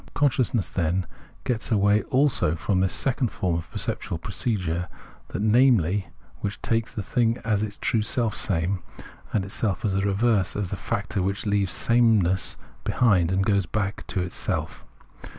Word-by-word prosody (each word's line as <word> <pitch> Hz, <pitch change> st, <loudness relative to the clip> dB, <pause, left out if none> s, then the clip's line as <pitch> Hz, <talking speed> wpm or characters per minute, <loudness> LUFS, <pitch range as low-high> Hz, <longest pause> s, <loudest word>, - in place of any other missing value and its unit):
Consciousness, 125 Hz, -6 st, +2 dB
then, 90 Hz, +1 st, 0 dB, 0.4 s
gets 120 Hz, -1 st, -2 dB
away 105 Hz, 0 st, +4 dB
also 130 Hz, -, +2 dB
from 90 Hz, +4 st, 0 dB
this 95 Hz, -1 st, +2 dB
second 135 Hz, -, 0 dB
form 95 Hz, -4 st, -2 dB
of 85 Hz, 0 st, -3 dB
perceptual 85 Hz, -, -3 dB
procedure, 90 Hz, -3 st, -2 dB, 0.4 s
that, 100 Hz, -, -3 dB
namely, 105 Hz, -5 st, +4 dB, 0.3 s
which 100 Hz, 0 st, -4 dB
takes 115 Hz, -1 st, 0 dB
the 105 Hz, -, -4 dB
thing 115 Hz, +3 st, +1 dB
as 105 Hz, -3 st, +1 dB
the 110 Hz, -, -1 dB
true 115 Hz, -, +1 dB
selfsame, 100 Hz, -5 st, -1 dB, 0.5 s
and 100 Hz, -3 st, 0 dB
itself 100 Hz, -2 st, -2 dB
as 100 Hz, -, +1 dB
the 95 Hz, -, +1 dB
reverse, 100 Hz, 0 st, +1 dB
as 100 Hz, -3 st, -2 dB
the -, -, -1 dB
factor 100 Hz, 0 st, -2 dB
that 100 Hz, +4 st, -2 dB
leaves 100 Hz, -3 st, +1 dB
sameness 110 Hz, -6 st, +3 dB, 0.3 s
behind 95 Hz, -8 st, +3 dB
and 95 Hz, +1 st, +1 dB
goes 100 Hz, -4 st, +2 dB
back 100 Hz, 0 st, -2 dB
into 90 Hz, -1 st, -1 dB
self. -, -, -3 dB
100 Hz, 150 wpm, -25 LUFS, 95-115 Hz, 0.5 s, away